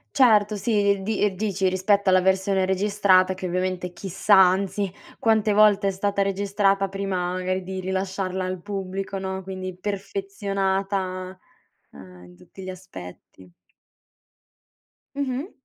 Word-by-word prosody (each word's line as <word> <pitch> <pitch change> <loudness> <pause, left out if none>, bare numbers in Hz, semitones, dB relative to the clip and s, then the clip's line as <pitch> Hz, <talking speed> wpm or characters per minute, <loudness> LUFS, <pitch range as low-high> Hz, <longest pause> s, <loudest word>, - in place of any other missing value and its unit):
Certo, 215 -6 +4
sì, 200 -1 +1
di 215 +1 -2
ehm, 200 -2 +1
dici, 195 -2 0
rispetto 190 +1 +2
alla 185 - +5
versione 190 +1 +1
registrata, 190 -1 +3
che, 185 0 -5
ovviamente, 180 0 -2
chissà, 195 +3 +1
anzi, 190 +1 +3 0.3
quante 220 -2 +2
volte 205 -1 +5
è - - +2
stata 200 +1 -1
registrata, 195 0 +1
prima 190 -2 -2
magari 185 0 -2
di 190 +1 -5
rilasciarla 190 0 -2
al 185 0 -3
pubblico, 195 0 -4
no, 190 0 -4
quindi 185 0 -6
perfezionata, 195 -1 -3 0.5
ehm, 90 -1 -13
in 90 0 -16
tutti 90 - -14
gli 185 - -7
aspetti. 95 - -11 1.6
Mh-mh. 280 +4 -3
190 Hz, 125 wpm, -24 LUFS, 185-200 Hz, 1.6 s, alla